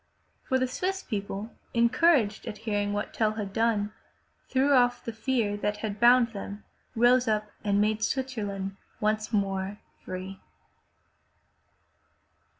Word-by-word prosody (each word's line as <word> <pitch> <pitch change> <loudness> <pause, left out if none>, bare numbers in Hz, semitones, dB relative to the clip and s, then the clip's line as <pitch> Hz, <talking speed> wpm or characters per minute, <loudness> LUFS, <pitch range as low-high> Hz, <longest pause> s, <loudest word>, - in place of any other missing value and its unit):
For 260 - 0
the 255 0 +1
Swiss 380 +9 -2
people, 205 0 -4 0.2
encouraged 235 -1 +3
at 210 - -5
hearing 205 -2 0
what 205 0 -3
Tell 215 -1 +1
had 205 -3 -5
done, 215 -2 +1 0.6
threw 270 +2 +3
off 245 -2 +3
the 230 - -4
fear 225 -2 0
that 210 0 -1
had 210 -1 -4
bound 240 0 +6
them, 205 -1 -7 0.3
rose 245 +2 +4
up 215 -1 0
and 205 -1 +2
made 215 +1 +1
Switzerland 205 -7 -2 0.2
once 215 +1 0
more 195 -1 -1 0.3
free. 185 +1 -6
215 Hz, 130 wpm, -28 LUFS, 205-245 Hz, 0.6 s, bound